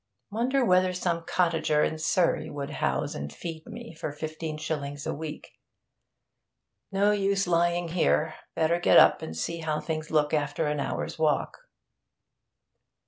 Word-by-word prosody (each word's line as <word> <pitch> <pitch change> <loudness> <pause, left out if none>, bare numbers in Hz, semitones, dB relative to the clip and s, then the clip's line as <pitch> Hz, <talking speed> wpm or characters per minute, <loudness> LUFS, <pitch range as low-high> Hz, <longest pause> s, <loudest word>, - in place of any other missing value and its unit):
Wonder 250 +5 +1
whether 185 -2 +3
some 170 -2 -1
cottager 165 -4 +2
in 160 - -1
Surrey 170 +2 +1
would 145 0 -5
house - - -1
and 70 0 -5
feed 160 - -7
me 235 -1 -9
for 155 -2 -5
fifteen 155 +1 -5
shillings 145 -2 -4
a - - -1
week?... 155 0 -7 1.4
No 200 +1 +3
use 195 -1 +1
lying 175 0 +1
here. 160 -2 +2 0.2
Better 165 +2 +2
get - - +5
up - - +7
and 80 - -6
see 170 - -3
how 155 -1 -1
things 155 0 -4
look 150 -1 +2
after 150 +1 0
an 150 0 -1
hour's 140 - -3
walk.' 150 -3 +1
160 Hz, 145 wpm, -27 LUFS, 150-180 Hz, 1.4 s, up